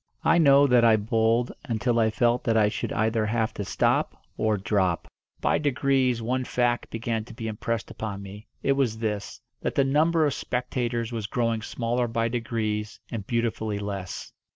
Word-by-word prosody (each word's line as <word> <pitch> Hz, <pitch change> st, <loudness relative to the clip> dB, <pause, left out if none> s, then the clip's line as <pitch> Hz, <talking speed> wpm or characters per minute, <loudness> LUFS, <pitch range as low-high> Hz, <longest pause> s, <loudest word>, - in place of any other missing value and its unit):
I 170 Hz, -, +4 dB
know 140 Hz, -2 st, +6 dB
that 125 Hz, -3 st, +4 dB
I 115 Hz, -1 st, +6 dB
bowled 115 Hz, +3 st, +1 dB
until 120 Hz, +1 st, 0 dB
I 110 Hz, -1 st, +4 dB
felt 120 Hz, +2 st, +1 dB
that 115 Hz, -1 st, +2 dB
I 105 Hz, -1 st, +4 dB
should -, -, -4 dB
either 110 Hz, 0 st, +1 dB
have 110 Hz, 0 st, 0 dB
to 100 Hz, -, -4 dB
stop -, -, 0 dB, 0.2 s
or 110 Hz, -1 st, +1 dB
drop. 95 Hz, -3 st, 0 dB, 0.3 s
By -, -, +2 dB
degrees 135 Hz, -4 st, +1 dB
one 130 Hz, +3 st, 0 dB
fact 120 Hz, -1 st, 0 dB
began 115 Hz, -1 st, -2 dB
to -, -, -12 dB
be 115 Hz, 0 st, -5 dB
impressed 110 Hz, +1 st, -3 dB
upon 100 Hz, -3 st, -5 dB
me. 100 Hz, +2 st, -10 dB, 0.2 s
It 140 Hz, -, +2 dB
was 135 Hz, -5 st, +1 dB
this 105 Hz, -2 st, -3 dB, 0.2 s
that -, -, -2 dB
the 140 Hz, -, +4 dB
number 155 Hz, +4 st, +3 dB
of 145 Hz, -, +1 dB
spectators 120 Hz, -2 st, -2 dB
was 110 Hz, -3 st, -3 dB
growing 115 Hz, 0 st, 0 dB
smaller 120 Hz, +2 st, -1 dB
by 115 Hz, 0 st, 0 dB
degrees 110 Hz, -3 st, -2 dB
and 105 Hz, -4 st, -5 dB
beautifully 115 Hz, -3 st, -1 dB
less. 100 Hz, -2 st, -5 dB
115 Hz, 175 wpm, -26 LUFS, 110-125 Hz, 0.3 s, know